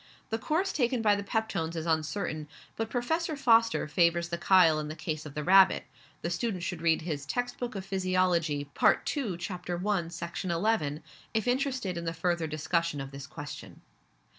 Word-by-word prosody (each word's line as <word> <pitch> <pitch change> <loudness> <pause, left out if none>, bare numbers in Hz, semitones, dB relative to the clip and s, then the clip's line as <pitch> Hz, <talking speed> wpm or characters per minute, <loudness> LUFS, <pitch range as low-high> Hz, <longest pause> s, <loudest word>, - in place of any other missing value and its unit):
The 225 - 0
course 335 - 0
taken 245 -3 +1
by 210 -1 +5
the 200 - -3
peptones 200 -6 -2
is 165 -1 -3
uncertain, 155 -1 -1 0.3
but 225 0 -3
Professor 315 +7 -1
Foster 230 - +3
favours 170 +1 +2
the 170 - -2
chyle 170 -4 +5
in 150 - -4
the 155 - -6
case 155 -1 -4
of 140 - -11
the 150 - -2
rabbit 190 +3 +6 0.4
the 170 - -1
student 190 -2 -2
should 175 -3 -3
read 165 -1 +2
his 150 -4 -3
Text 245 - -3
book 245 -2 -4
of 190 -1 -5
Physiology, 185 -6 +1
Part - - +3
2, 230 - -2
Chapter 180 -1 -4
1, 185 -2 0
Section 170 +2 -5
11, 170 -5 0 0.3
if 220 +2 +1
interested 250 -7 0
in 170 - -6
the 165 - -1
further 170 0 0
discussion 155 0 -1
of 135 0 -6
this 140 0 -8
question. 145 +1 -9
175 Hz, 185 wpm, -29 LUFS, 160-220 Hz, 0.4 s, rabbit